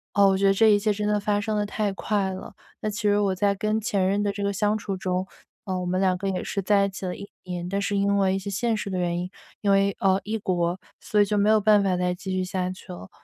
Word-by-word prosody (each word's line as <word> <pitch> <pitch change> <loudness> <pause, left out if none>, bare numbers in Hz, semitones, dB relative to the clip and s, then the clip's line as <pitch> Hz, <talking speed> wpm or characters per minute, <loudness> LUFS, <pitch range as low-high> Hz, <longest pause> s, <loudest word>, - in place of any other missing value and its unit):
哦， 200 -1 +6
我 190 - +3
觉 195 +1 +3
得 195 - +5
这 220 +3 +5
一 205 - +4
切 210 +1 +1
真 210 +1 -2
地 210 0 +2
发 205 0 0
生 215 +1 -2
得 210 - +1
太 205 0 -2
快 200 -1 -1
了。 185 - -8 0.4
其 210 +2 -5
实 205 -1 +3
我 195 -2 +1
在 200 +1 +2
跟 215 +2 -1
前 200 -3 0
任 200 +2 +1
的 205 - 0
这 200 0 -6
个 200 - +1
相 210 +1 +1
处 200 -2 -4
中， 185 0 -2 0.4
呃， 185 -2 -2
我 180 - -3
们 180 +1 0
两 190 -1 +2
个 195 +1 -2
也 185 -1 -2
是 200 - -3
在 200 +1 +3
一 - - -2
起 190 0 -7
了 180 - -3
1 200 - -9 0.2
年， 175 -1 -5
但 200 +2 -1
是 200 0 -1
因 200 0 +2
为 190 -1 +2
一 - - 0
些 195 +1 -6
现 225 +3 0
实 205 - -4
的 185 - -1
原 175 -1 0
因， 180 - -3 0.3
因 200 - +2
为， 195 0 +3
呃， 195 0 +2
异 215 +2 -2
国， 180 -3 -1 0.2
所 210 - 0
以 205 - +6
就 210 - -1
没 205 +1 +3
有 215 0 +5
办 210 0 +5
法 185 -2 +1
再 180 0 0
继 190 +2 -6
续 185 0 0
下 185 -1 -2
去 185 0 -9
了， 95 - -10
200 Hz, 315 characters per minute, -25 LUFS, 185-205 Hz, 0.4 s, 哦